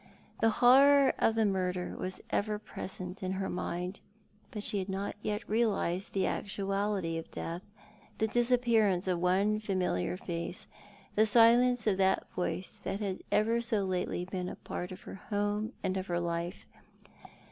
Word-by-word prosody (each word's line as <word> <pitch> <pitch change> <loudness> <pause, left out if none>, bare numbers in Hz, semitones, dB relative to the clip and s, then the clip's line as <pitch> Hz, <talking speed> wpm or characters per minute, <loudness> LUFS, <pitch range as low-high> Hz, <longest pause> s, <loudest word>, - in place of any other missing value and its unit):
The 225 - +4 0.2
horror 275 +2 +7
of 225 - +3
the 225 -1 +3
murder 185 -2 -1
was 185 0 -4
ever 210 +1 0
present 190 -3 -7
in 185 0 -2
her 190 0 -2
mind, 180 +1 -3 0.5
but 210 -2 -5
she 205 - 0
had 190 +1 -4
not 195 +1 -3
yet 210 +1 -3
realised 205 -4 0
the 195 - +1
actuality 195 -4 -1
of 165 - -9
death, 170 +2 -5 0.6
the 220 - +1
disappearance 230 -5 +2
of 180 -2 +1
one 195 +4 +2
familiar 185 - -1
face, 175 +2 -4 0.5
the 215 +1 +4
silence 235 +2 +5
of 205 -4 +2
that 190 0 +2
voice 180 +1 -3
that 195 - -3
had 195 -3 -2 0.4
so 215 -4 +1
lately 180 -1 -1
been 180 -1 -4
part 180 - -5
of 185 - -9
her 195 - -10
home 205 +1 0
and 185 - 0
of 190 0 -4
her 175 0 0
life. 170 +1 -3
195 Hz, 155 wpm, -31 LUFS, 180-215 Hz, 0.6 s, horror